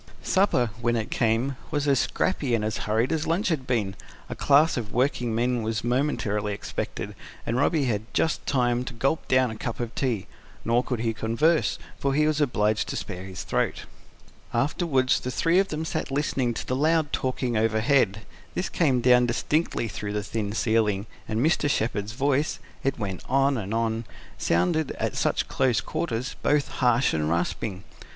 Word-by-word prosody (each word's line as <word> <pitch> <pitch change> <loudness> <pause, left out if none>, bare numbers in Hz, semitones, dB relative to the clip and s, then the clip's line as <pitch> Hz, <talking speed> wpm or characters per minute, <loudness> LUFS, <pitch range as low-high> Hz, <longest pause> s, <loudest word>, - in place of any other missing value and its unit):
Supper, 160 - +2
when 120 0 +1
it 115 +4 -2
came, 125 -2 +1
was 145 -2 -1
as 135 -3 +4
scrappy 140 -9 0
and 105 -2 -1
as 110 -1 -1
hurried 115 +5 +2
as 160 -1 -1
lunch 175 +5 +1
had 140 -6 -1
been: 110 -6 0 0.4
a - - -4
class 145 +3 +4
of 110 -4 -4
working 125 -2 0
men 120 +1 +1
was 110 0 -2
momently 115 -5 0
expected, - - -5 0.3
and 115 - -1
Robby 145 +2 +2
had 110 -2 -2
just 160 - 0
time 125 -2 +2
to 125 - -6
gulp 135 +7 0
down 130 -2 +3
a - - -6
cup 115 +1 -5
of 120 -1 -3
tea. 120 -8 -1 0.4
Nor 120 +2 +3
could 125 -4 -3
he 115 -1 0
converse; 115 - +1 0.2
for 140 -1 0
he 150 +1 +3
was 155 0 +1
obliged 105 -6 +1
to - - -4
spare 95 -2 -5
his 95 -1 -6
throat. - - -1 0.7
Afterwards 135 0 +2
the 125 - -4
three 165 +8 +2
of 195 - +2
them 155 -2 -3
sat - - -3
listening 135 -4 0
to - - -4
the 130 - -1
loud 155 +1 +2
talking 130 -2 -1
overhead. 110 0 +2 0.3
This 180 - -1
came 135 -7 +2
down 125 0 +5
distinctly 140 +1 0
through 105 -1 -5
the 105 -1 -1
thin 105 -1 -3
ceiling, 110 -3 +1 0.2
and 115 +4 0
Mr. 160 -2 +2
Shepherd's 110 -4 -1
voice 140 +3 +1 0.3
it 135 0 0
went 95 -5 -4
on 135 +1 +3
and 105 -4 -4
on 115 0 0 0.3
sounded, 90 - +1
at - - -2
such - - 0
close 130 -4 +2
quarters, 135 -5 -3
both 145 -1 +2
harsh 125 0 +2
and 75 -1 0
rasping. 90 +3 -2 0.2
Mrs. - - -14
125 Hz, 180 wpm, -26 LUFS, 110-140 Hz, 0.7 s, down